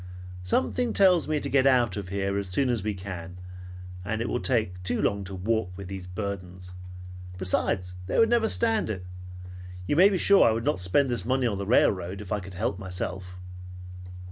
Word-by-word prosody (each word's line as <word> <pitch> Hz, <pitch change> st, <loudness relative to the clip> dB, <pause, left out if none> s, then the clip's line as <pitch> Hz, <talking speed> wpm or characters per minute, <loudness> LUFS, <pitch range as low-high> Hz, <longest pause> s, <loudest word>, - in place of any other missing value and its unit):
Something 235 Hz, -, 0 dB
tells 185 Hz, -4 st, +4 dB
me 155 Hz, -1 st, 0 dB
to 140 Hz, -, -4 dB
get 135 Hz, -1 st, +3 dB
out 120 Hz, -7 st, +3 dB
of 100 Hz, -3 st, -5 dB
here 100 Hz, 0 st, -1 dB
as 100 Hz, -2 st, -2 dB
soon 130 Hz, +8 st, +1 dB
as 120 Hz, -3 st, 0 dB
we 105 Hz, +1 st, -2 dB
can 90 Hz, -2 st, -7 dB, 0.7 s
and 110 Hz, +3 st, -3 dB
it 120 Hz, -, -2 dB
will 125 Hz, -, -1 dB
take 110 Hz, -9 st, 0 dB
too 90 Hz, -, 0 dB
long 100 Hz, 0 st, 0 dB
to 95 Hz, +1 st, -7 dB
walk 110 Hz, +1 st, -1 dB
with 100 Hz, -2 st, -8 dB
these 95 Hz, -2 st, -7 dB
burdens. 90 Hz, -2 st, -6 dB, 0.6 s
Besides, 90 Hz, 0 st, -1 dB
they -, -, -1 dB
would 225 Hz, -, +6 dB
never 230 Hz, -1 st, +2 dB
stand 225 Hz, -, +1 dB
it. 95 Hz, -4 st, -4 dB, 0.8 s
You 145 Hz, -, 0 dB
may 185 Hz, +5 st, +7 dB
be 195 Hz, -, 0 dB
sure 200 Hz, +2 st, +5 dB
I 110 Hz, -, +3 dB
would 115 Hz, +1 st, -3 dB
not -, -, +1 dB
spend 110 Hz, +9 st, +2 dB
this 120 Hz, -, -1 dB
money 130 Hz, +1 st, 0 dB
on 105 Hz, -5 st, -1 dB
the 100 Hz, -, -4 dB
railroad 95 Hz, -4 st, +2 dB
if 105 Hz, -3 st, -9 dB
I 105 Hz, -, 0 dB
could 95 Hz, -1 st, -10 dB
help 100 Hz, 0 st, -2 dB
myself." 90 Hz, -1 st, -6 dB
100 Hz, 200 wpm, -26 LUFS, 90-130 Hz, 0.8 s, may